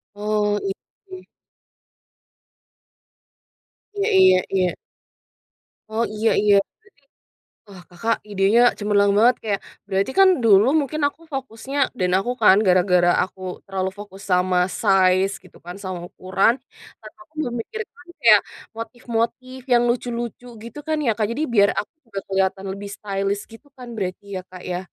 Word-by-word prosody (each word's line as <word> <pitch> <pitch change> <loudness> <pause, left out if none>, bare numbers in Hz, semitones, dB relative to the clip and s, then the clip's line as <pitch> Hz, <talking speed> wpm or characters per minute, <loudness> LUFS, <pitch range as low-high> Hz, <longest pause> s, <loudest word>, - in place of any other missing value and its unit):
Oh 210 0 0
iya 195 -1 -2 0.4
sih. 375 0 -9 2.7
Iya 400 - 0 0.2
iya 185 0 +6 0.2
iya. 180 -2 +1 1.1
Oh 225 +2 -1
iya 225 +1 +1
iya 205 -1 +5 0.9
berarti, - - -70
wah 195 -3 -13
Kakak 225 +6 -1
idenya 200 +4 +3 0.2
cemerlang 205 -1 +2
banget 240 +2 +5
kayak 205 -3 -1 0.3
berarti 195 +6 0
kan 385 -1 +8 0.2
dulu 205 0 +6
mungkin 305 +2 -4
aku 315 - -16
fokusnya 270 +1 -5 0.2
dan 180 -1 +1
aku 240 +6 -2
kan 195 -2 +7
gara-gara 180 -1 +4
aku 185 0 -14 0.3
terlalu 190 -1 -2
fokus 200 -1 -10
sama 180 0 +2 0.2
size 195 -1 +3
gitu 185 - -18
kan, 175 - -6
sama 185 -2 -5
ukuran, 190 +5 +1 0.5
tapi 215 - -12
aku 320 -3 -24
gak 240 - -4
memikirkan 360 - -7
kayak 215 -4 +7 0.4
motif-motif 235 +2 -4
yang 240 0 +5
lucu-lucu 240 0 -4 0.2
gitu 235 +5 -10
kan 310 -1 0
ya - - +4
Kak, 215 - +1
jadi 295 - -3
biar 200 -1 +5
aku 205 - -11
enggak 200 -3 -6
keliatan 190 0 0
lebih 200 +1 -7
stylish 200 0 -2
gitu 225 +6 -15
kan 250 -1 -10
berarti 190 0 -4
ya - - -5
Kak 185 -1 -11
ya. 175 - -1
205 Hz, 145 wpm, -22 LUFS, 190-235 Hz, 2.7 s, kan